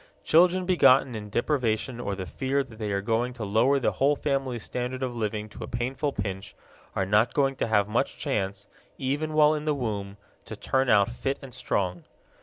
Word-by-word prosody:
Children 180 +3 +4
begotten 135 -8 +5
in 105 -2 -6
deprivation 120 0 0
or 100 -4 -3
the 95 -1 -5
fear 135 +8 -1
that 115 -4 -15
they 105 -2 -2
are 100 0 -1
going 115 +3 0
to 120 -3 -5
lower 115 +7 +3
the 135 - +1
whole 140 +2 +2
family's 135 -6 -2
standard 125 +1 -4
of 125 -2 -3
living 110 -1 -2
to - - -9
a - - -6
painful 130 +5 -2
pinch 100 -2 -5 0.4
are 95 - +1
not 105 +4 +2
going 135 -2 +2
to - - -1
have 105 -3 +2
much 115 +5 -1
chance, 100 -7 -2 0.3
even 145 +4 -2
while 155 0 +5
in 150 0 -3
the 150 -1 +1
womb, 105 -6 -4 0.3
to - - -7
turn 130 -1 0
out 100 -2 +5
fit 135 +3 -2
and 130 -2 -10
strong. 90 -6 -2
120 Hz, 200 wpm, -27 LUFS, 105-135 Hz, 0.4 s, begotten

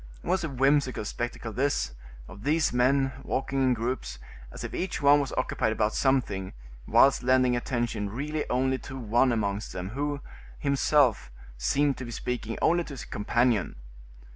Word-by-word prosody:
It - - -11
was 180 0 +1
a 160 - -2
whimsical 135 -3 +1
spectacle 120 0 -4
this, 135 - 0 0.3
of 100 +2 -12
these 150 +4 +1
men 135 +2 +3
walking 135 0 -2
in 130 -1 +3
groups, 115 - -3 0.3
as - - -8
if - - -6
each 185 - -2
one 145 0 +6
was 140 -2 -2
occupied 130 -3 0
about 110 0 0
something, 110 -9 0 0.3
whilst 140 - +5
lending 130 0 +3
attention 120 -4 -2
really 150 +7 -3
only 130 +1 +1
to 135 - -8
one 120 +2 +2
amongst 105 -3 -2
them, 90 0 -5
who, 145 +5 -2 0.4
himself, 140 -3 +2 0.3
seemed 140 - +1
to 130 - -6
be - - -8
speaking 115 -1 -4
only 175 +1 +3
to 145 - -8
his 125 - -7
companion. 115 -1 0
130 Hz, 165 wpm, -27 LUFS, 115-140 Hz, 0.4 s, one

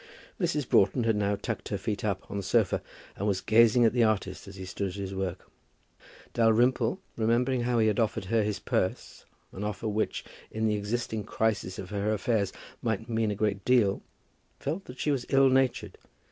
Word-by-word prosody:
Mrs. 155 -7 0
Broughton 115 +5 +3
had 115 -1 +2
now 105 0 +1
tucked 100 - -5
her - - -1
feet 105 -2 -3
up 100 -3 -1
on - - -7
the 100 - -1
sofa, 100 0 +2 0.3
and 100 - -2
was 100 -2 +1
gazing 115 +3 +5
at 115 - +3
the 120 -2 +3
artist 100 -4 -1
as 100 - -10
he 95 -1 -7
stood 100 +2 -3
at - - -8
his 100 -1 -5
work. 95 -1 -4 0.9
Dalrymple, 120 +4 +3 0.2
remembering 120 +3 +1
how 120 0 +1
he 110 - +4
had 105 0 +1
offered 110 -3 0
her 115 +3 +2
his 105 -1 -1
purse, 110 -7 -2 0.3
an 95 - -6
offer 105 +2 -3
which, 110 +1 -1 0.2
in 110 0 -2
the 110 - +2
existing 110 +1 -2
crisis 105 -3 -1
of 95 +1 -7
her 105 +1 0
affairs, 105 -2 0 0.3
might 110 0 -2
mean 110 -1 +1
a 105 - -1
great 100 -1 -1
deal, 120 -6 +3 0.6
felt 165 +8 -3
that 125 - -10
she 150 - 0
was 135 -4 -2
ill 135 0 +5
natured. 130 -6 +1
110 Hz, 195 wpm, -28 LUFS, 100-120 Hz, 0.9 s, gazing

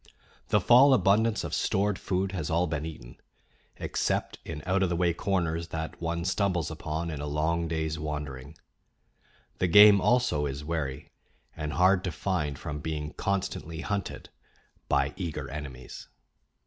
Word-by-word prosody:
The - - +3
fall 130 +3 +7
abundance 105 +2 +2
of - - -5
stored 100 0 0
food 95 0 -1
has 90 -5 -3
all 85 +2 +2
been 75 -2 -3
eaten, - - -10 0.6
except - - -2
in 75 -2 -7
out 95 +1 +1
of 95 - +2
the 85 - 0
way 85 0 +2
corners 85 -3 -1
that 80 0 -5
one 85 0 -2
stumbles 95 -4 0
upon 80 +1 -4
in 75 -2 -5
a 75 - -4
long 80 +3 0
day's 80 -1 -2
wandering; 75 -4 -5 1.0
the 90 - +2
game 105 +2 +8
also 120 -13 +2
is 70 +2 -5
wary 75 -3 -4 0.4
and 75 -1 -4
hard 95 +1 +4
to 90 - -1
find 75 -4 -2
from 75 -1 -5
being 75 0 -4
constantly 95 -4 -3
hunted 100 0 -4 0.6
by 70 +1 +2
eager 85 -5 -4
enemies. 70 -4 -8
85 Hz, 150 wpm, -28 LUFS, 75-95 Hz, 1.0 s, game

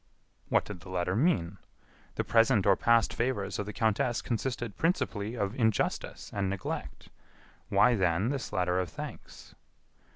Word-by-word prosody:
What - - +3
did 105 -4 -7
the 90 - -13
letter 90 0 -1
mean? 100 - +1 0.6
The - - 0
present 115 -3 +3
or 100 -1 +6
past 115 +1 +3
favors 120 -4 -1
of 105 - -3
the - - -3
countess 110 +2 0
consisted 120 -2 -3
principally 115 - -1
of 100 -3 -1
injustice 110 -5 -1
and 100 -1 -1
neglect. 100 -1 -5 0.6
Why, 125 - +5
then, 95 0 +1
this 135 -3 -3
letter 90 0 +1
of 90 -2 -2
thanks? - - -9
105 Hz, 150 wpm, -30 LUFS, 95-120 Hz, 0.6 s, or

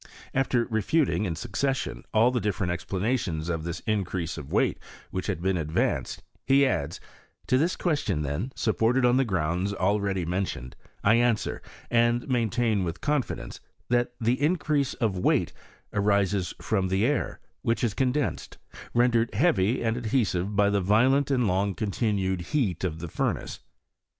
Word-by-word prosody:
After 125 -3 +1
refuting 110 - +1
in 85 -4 -2
succession 130 - -2
all 115 +3 +4
the 125 - 0
different 95 -3 -1
explanations 90 -3 -2
of 80 -2 -2
this 85 +1 -4
increase 90 -5 -2
of 75 -3 -8
weight - - +1 0.3
which - - -3
had 85 - -2
been 95 -1 +1
advanced, 80 -1 -1 0.2
he 140 +1 +4
adds, 70 - -1 0.2
" - - -34
To 130 - +4
this 170 +5 +1
question, 145 - 0
then, 75 - -3
supported 115 +3 +2
on 125 +1 +4
the 135 - +4
grounds 95 -1 -1
already 100 -1 0
mentioned, 90 -8 -3 0.3
I 110 +3 +5
an 120 -1 +4
swer, - - -5 0.3
and 120 0 +2
maintain 120 -4 +1
with 85 0 -4
confidence, 145 -3 -2 0.3
that 120 0 +1
the 120 +4 +1
increase 150 -3 +1
of 100 -5 -1
weight - - +2 0.4
arises 100 -2 +1
from 95 -4 0
the 95 +4 +1
air, 145 +1 -1 0.2
which 115 +2 0
is 115 -4 +1
condensed^ 135 +5 -1 0.2
I - - -14 0.2
rendered 120 -2 +3
heavy 120 - +2
and 115 0 +1
adhesive 105 -5 0
by 100 0 +4
the 100 -1 +1
violent 125 +9 +3
and 130 -3 +2
long 95 +1 +1
continued 100 -3 -1
heat 105 - -1
ofthe 85 -2 -4
furnace. - - -2
105 Hz, 155 wpm, -27 LUFS, 95-125 Hz, 0.4 s, I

